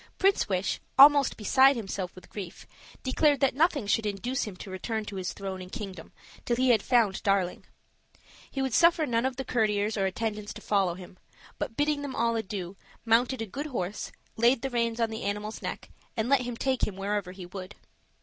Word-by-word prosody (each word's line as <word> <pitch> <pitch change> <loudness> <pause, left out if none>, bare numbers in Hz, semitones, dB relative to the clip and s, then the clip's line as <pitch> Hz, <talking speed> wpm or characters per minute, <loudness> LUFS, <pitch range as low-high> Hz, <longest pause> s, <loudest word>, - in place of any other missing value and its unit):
Prince 390 - +2
Wish, 185 0 0 0.2
almost 285 0 +7
beside 265 +6 +5
himself 195 -5 -4
with 185 - -13
grief, 195 -2 -7 0.4
declared 285 +2 +3
that 275 - +3
nothing 295 - +2
should 215 +1 +1
induce 240 +6 -2
him 210 -4 -7
to 190 - -9
return 215 +4 -3
to 200 -1 -6
his 185 -1 -3
throne 190 -2 -6
and 185 0 -10
kingdom 195 -8 -7 0.3
till 240 - 0
he 255 +1 +2
had 220 -4 +4
found 225 -6 +2
Darling. 195 -3 0 0.8
He 270 - -2
would 265 -3 -2
suffer 335 +1 +5
none 240 -1 +1
of 260 -1 -5
his 265 - -4
courtiers 215 -3 +1
or 195 -1 +2
attendants 210 +1 -4
to - - -9
follow 195 -4 +1
him; 185 0 -12 0.4
but 225 - -4
bidding 295 0 +1
them 280 -2 -5
all 230 0 +1
adieu, 195 -4 -4 0.3
mounted 235 +2 +3
a - - -4
good 275 +9 -5
horse, 205 -8 -4 0.3
laid 235 +2 +3
the 270 - -2
reins 235 -1 0
on 230 -1 +1
the 220 - -5
animal's 210 +2 -3
neck, - - -6 0.3
and 220 +2 0
let 275 -2 +4
him 245 -1 -4
take 260 0 0
him 205 - -6
wherever 195 -1 -2
he 185 -1 -9
would. 185 +2 -8
220 Hz, 200 wpm, -28 LUFS, 195-260 Hz, 0.8 s, almost